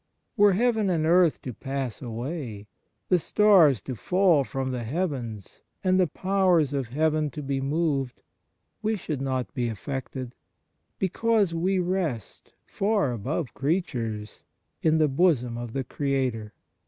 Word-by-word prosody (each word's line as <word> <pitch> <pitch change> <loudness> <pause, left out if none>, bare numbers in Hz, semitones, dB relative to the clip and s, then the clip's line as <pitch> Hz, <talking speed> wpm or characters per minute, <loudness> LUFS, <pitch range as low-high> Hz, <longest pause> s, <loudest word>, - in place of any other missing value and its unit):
Were 205 -3 +5
heaven 220 -1 +2
and 165 -3 +1
earth 170 -1 +3
to 125 - -5
pass 135 -1 -4
away, 120 -2 -5 0.4
the 180 - +4
stars 170 - +4
to 130 - -4
fall 175 - +3
from 130 0 -3
the 125 -2 -3
heavens 120 - -4 0.2
and 185 0 +3
the 180 - +4
powers 185 -5 +2
of 135 -4 -1
heaven 155 +4 +1
to 150 +2 -7
be 135 -1 -2
moved, 140 -3 -1 0.6
we 220 +1 0
should 155 -8 -4
not 130 -2 -2
be 120 -2 -1
affected, 130 +2 -5 0.6
because 205 -1 +1
we 185 +4 +1
rest, 175 - -3
far 200 - 0
above 125 +6 -3
creatures, 120 - -2 0.4
in 160 0 +3
the 155 -1 +4
bosom 135 -5 +2
of 120 -1 -6
the 135 - -1
Creator. 130 -5 -2
145 Hz, 140 wpm, -26 LUFS, 125-180 Hz, 0.6 s, Were